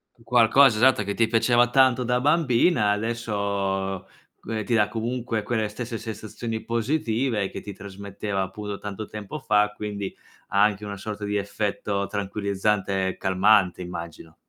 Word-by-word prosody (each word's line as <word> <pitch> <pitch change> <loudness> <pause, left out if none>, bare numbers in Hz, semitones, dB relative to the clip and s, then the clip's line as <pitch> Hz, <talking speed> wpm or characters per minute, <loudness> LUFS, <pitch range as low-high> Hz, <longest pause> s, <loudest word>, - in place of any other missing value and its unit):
Un 115 - -22
qualcosa, 120 +1 +5
esatto, 125 -2 +4
che 100 0 -3
ti 115 - +3
piaceva 120 +1 +3
tanto 130 -1 +4
da 125 +1 +1
bambina 145 -5 +3
adesso 100 -3 -2 0.3
c - - -29
uhm, 110 -1 -2
ti 115 - 0
dà 105 -2 +4
comunque 115 +1 -2
quelle 110 0 -1
stesse 115 +2 -5
sensazioni 110 +1 -5
positive 115 -3 0
che - - -7
ti 100 0 -7
trasmetteva, 100 0 -4
appunto, 105 +1 -6
tanto 105 +1 -6
tempo 105 +7 -7
fa, 105 -5 +2
quindi, 100 -2 -5 0.3
ha 100 - +2
anche 105 0 +2
una 100 -1 -5
sorta 105 +1 -5
di 105 0 -2
effetto 100 0 -2
tranquillizzante 100 -1 -1
e 95 - -4
calmante, 95 -1 +3
immagino. 85 -2 -8
105 Hz, 155 wpm, -25 LUFS, 100-115 Hz, 0.3 s, qualcosa